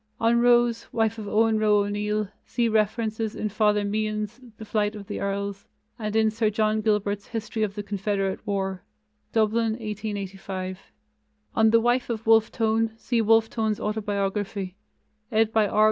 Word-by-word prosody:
On 230 +1 +3
Rose, 240 -1 +3
wife 225 -1 0
of 210 - -6
Owen 220 +1 +3
Roe 210 -1 +4
O'Neill, 210 +1 -1 0.2
see 240 -2 0
references 220 0 0
in 215 - -2
Father 210 0 +2
Meehan's 215 +2 -2 0.2
The 220 - -8
Flight 210 0 0
of 205 -1 -8
the - - -5
Earls, 200 0 -3 0.3
and 215 -1 -3
in 220 -1 +4
Sir 220 0 +1
John 215 0 +1
Gilbert's 205 -1 0
History 225 -1 -4
of 205 -2 -1
the 205 - -4
Confederate 200 -1 -1
War 195 -2 -2 0.5
(Dublin, 225 0 +2
1885). 195 -4 -5 0.6
On 220 0 +4
the 230 +1 +5
wife 240 +2 +1
of 225 -1 -3
Wolfe 225 -1 +5
Tone, 225 0 +1
see 235 0 0
Wolfe 225 +1 +4
Tone's 220 -2 -1
Autobiography, 205 -2 -2 0.6
ed. 220 0 +2
by 220 -2 +4
R. 210 - -1
215 Hz, 160 wpm, -25 LUFS, 205-225 Hz, 0.6 s, the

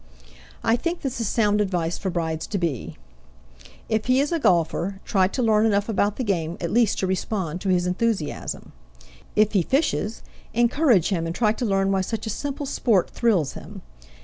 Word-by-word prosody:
I 225 +1 +3
think 335 +5 -3
this 260 -4 -3
is 225 - -1
sound 210 -1 +2
advice 175 -4 -1
for 190 - -2
brides 160 -3 -2
to 205 - -2
be: 165 - -3 0.9
If 220 0 -1
he 255 +1 +4
is 285 +3 +1
a 335 - +1
golfer, 180 - +1
try 190 -2 +3
to 250 +6 -2
learn 215 -2 +4
enough 205 -1 +1
about 205 -2 +1
the 255 - -3
game 170 -6 -1
at 170 -1 -3
least 235 -2 +3
to - - +1
respond 185 -2 -2
to 195 - -2
his 180 -1 +2
enthusiasm. 190 -2 -2 0.6
If 215 0 +4
he 195 - +4
fishes, 260 - 0 0.3
encourage 240 - +3
him 170 -4 -1
and 165 - -4
try 215 -1 +3
to 245 - -3
learn 195 -2 +1
why 190 -1 +2
such 220 +3 -4
a 220 - -2
simple 285 +5 -4
sport 225 -8 +1
thrills 190 - +1
him. - - -10
205 Hz, 190 wpm, -24 LUFS, 180-230 Hz, 0.9 s, he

